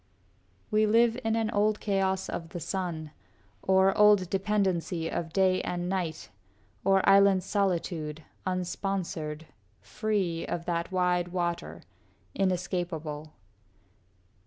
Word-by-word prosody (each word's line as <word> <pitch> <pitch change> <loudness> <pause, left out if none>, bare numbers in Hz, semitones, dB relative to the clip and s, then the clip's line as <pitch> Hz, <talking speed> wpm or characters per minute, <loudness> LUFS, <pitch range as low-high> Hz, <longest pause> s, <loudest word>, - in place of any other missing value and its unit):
We 215 0 +3
live 230 +2 +4
in 225 0 +1
an 225 -1 0
old 210 0 +2
chaos 190 -2 0
of 165 -1 -5
the 175 - -6
sun, 170 -4 -4 0.5
Or 190 0 +4
old 205 -4 +5
dependency 190 -4 0
of 165 0 -3
day 185 0 +3
and 175 0 -3
night, 180 -5 -3 0.5
Or 195 -1 +3
island 195 -1 +6
solitude, 170 -6 -1 0.2
unsponsored, 180 -4 -3 0.3
free, 200 -6 -2
Of 170 -1 -3
that 170 0 -2
wide 180 -1 +1
water, 175 -1 -3 0.5
inescapable. 175 -5 -2
185 Hz, 110 wpm, -28 LUFS, 170-195 Hz, 0.5 s, island